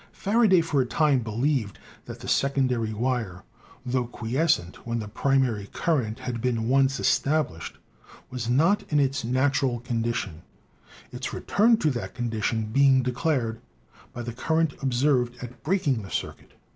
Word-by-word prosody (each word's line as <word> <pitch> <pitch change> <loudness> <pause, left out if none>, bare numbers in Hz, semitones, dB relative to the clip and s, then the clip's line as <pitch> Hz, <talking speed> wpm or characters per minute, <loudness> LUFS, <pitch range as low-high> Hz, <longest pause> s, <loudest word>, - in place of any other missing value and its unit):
Faraday, 205 -3 +3
for 160 -4 +1
a - - 0
time, 150 -1 +2
believed 115 0 -1 0.3
that - - -9
the - - -8
secondary 130 -5 +1
wire, 110 -5 -2 0.4
tho 125 -1 -1
quiescent 120 - 0
when 115 0 -4
the 110 -2 -4
primary 120 -3 0
current 130 -8 -1
had 125 -2 -4
been 115 -2 0
once 135 +1 +3
established, 140 - 0 0.5
was 125 -2 -4
not 165 +11 +3
in 150 - +3
its 135 -2 +1
natural 130 0 +1
condition, 115 -8 -3 0.7
its - - -5
return 225 +3 +3
to 155 -8 +1
that 120 -3 -5
condition 115 -2 -1
being 135 -1 +5
declared 125 -3 -1 0.5
by 120 - -6
the 120 0 -5
current 160 +4 0
observed 125 -2 +1
at 120 -1 -10
breaking 150 - 0
the 95 - -10
circuit. - - -5
125 Hz, 145 wpm, -26 LUFS, 115-140 Hz, 0.7 s, being